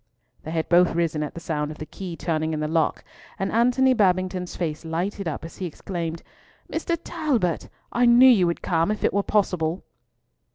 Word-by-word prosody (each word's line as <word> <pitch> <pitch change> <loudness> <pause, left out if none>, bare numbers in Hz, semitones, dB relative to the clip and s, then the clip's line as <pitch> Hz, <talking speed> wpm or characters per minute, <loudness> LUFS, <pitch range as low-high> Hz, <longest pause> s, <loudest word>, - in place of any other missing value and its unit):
They - - -8
had 160 0 -1
both 175 -1 +4
risen 165 -3 0
at 150 - -4
the - - -5
sound 150 -3 -2
of 155 - -8
the 155 - -6
key 175 +2 -7
turning 160 -2 -1
in 155 - -2
the 155 - -1
lock, 160 0 0 0.3
and 195 - -2
Antony 250 +3 +4
Babington's 185 -4 +1
face 160 -3 -3
lighted 175 +4 -3
up 160 0 -4
as 165 - -10
he 185 - -3
exclaimed, 170 0 -5 0.5
"Mr. 335 +1 -1
Talbot! 275 - -1 0.2
I 245 0 +3
knew 240 +2 +8
you 205 -9 +6
would 170 - -2
come 165 0 +1
if 215 - -2
it - - +2
were 200 - +2
possible." 180 -5 0
175 Hz, 195 wpm, -24 LUFS, 160-205 Hz, 0.5 s, knew